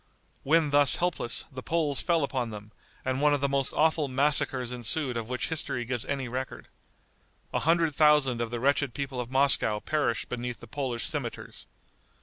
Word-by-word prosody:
When 155 +1 +2
thus 145 -1 +5
helpless, 170 -9 -1
the 130 -1 -7
Poles 150 -2 0
fell 165 -3 +1
upon 130 -4 -2
them, 105 -1 -9 0.3
and 130 +1 -1
one 150 0 +4
of 140 - -4
the 140 - +2
most 140 -1 0
awful 155 -1 +2
massacres 130 -2 +1
ensued 125 +3 0
of 115 0 -4
which 125 - -2
history 150 -6 -2
gives 125 -1 -3
any 135 -3 -2
record. 130 +2 -6 0.8
A - - +1
hundred 165 -1 +2
thousand 145 -5 +3
of 120 - -2
the 120 0 -4
wretched 140 0 +1
people 135 -3 -4
of 120 -1 -4
Moscow 130 -5 +4
perished 145 -3 -1
beneath 125 0 -5
the - - -10
Polish 130 -5 -4
cimeters. - - -6
135 Hz, 175 wpm, -28 LUFS, 125-150 Hz, 0.8 s, thus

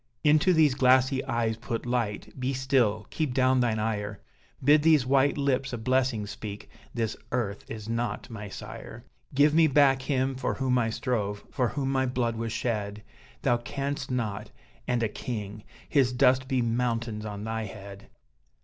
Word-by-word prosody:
"Into 155 +4 +5
these 155 -5 +4
glassy 130 0 +3
eyes 115 -3 0
put 115 +1 -4
light 120 -4 -2
be 130 +2 -1
still! 125 -6 +1
keep 150 -6 -2
down 130 0 +3
thine 120 -3 +1
ire, 105 -2 -2 0.4
Bid 145 +3 +6
these 155 -4 +4
white 135 +2 +3
lips 135 -2 0
a - - -2
blessing 125 -2 +1
speak 105 0 -8 0.2
this 115 -3 -2 0.2
earth 110 -5 -2
is 110 -1 -7
not 115 -2 -2
my 105 -3 -7
sire! 115 +4 -9 0.3
Give 145 +2 +5
me 160 0 +6
back 135 -2 +4
him 135 -1 0
for 130 - -2
whom 130 -2 +1
I 115 -2 +1
strove, 105 -3 -2
for 125 - +1
whom 135 +1 -2
my 130 -1 +1
blood 120 -2 -1
was 115 0 -3
shed, 105 -3 -2 0.4
Thou 120 - +3
canst 140 +3 -4
not 110 -4 -2 0.4
and 125 -2 +1
a - - +3
king! 105 -2 -6 0.2
His 130 -4 +2
dust 130 0 +3
be 130 -2 +1
mountains 115 -2 -1
on 105 -1 -6
thy 110 0 -3
head!" 100 0 -10
125 Hz, 165 wpm, -27 LUFS, 110-130 Hz, 0.4 s, Bid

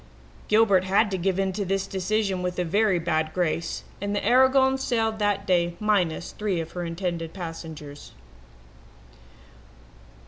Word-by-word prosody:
"Gilbert 210 -4 +4
had 200 +3 +2
to - - 0
give 190 +1 0
in 195 -1 0
to 200 +2 -2
this 195 0 -1
decision 195 0 -1
with 180 0 -3
a 180 - +1
very 200 +2 +2
bad 160 -2 -1
grace, 170 -2 -1 0.2
and 205 0 -2
the 205 - -2
Aragon 265 +1 +5
sailed 225 -4 0
that 205 -1 0
day 175 -2 +1
minus 185 -6 0
three 205 -5 -2
of 165 0 -5
her 180 - -4
intended 165 -1 -4
passengers. 160 -5 -8
190 Hz, 145 wpm, -25 LUFS, 170-210 Hz, 0.2 s, Aragon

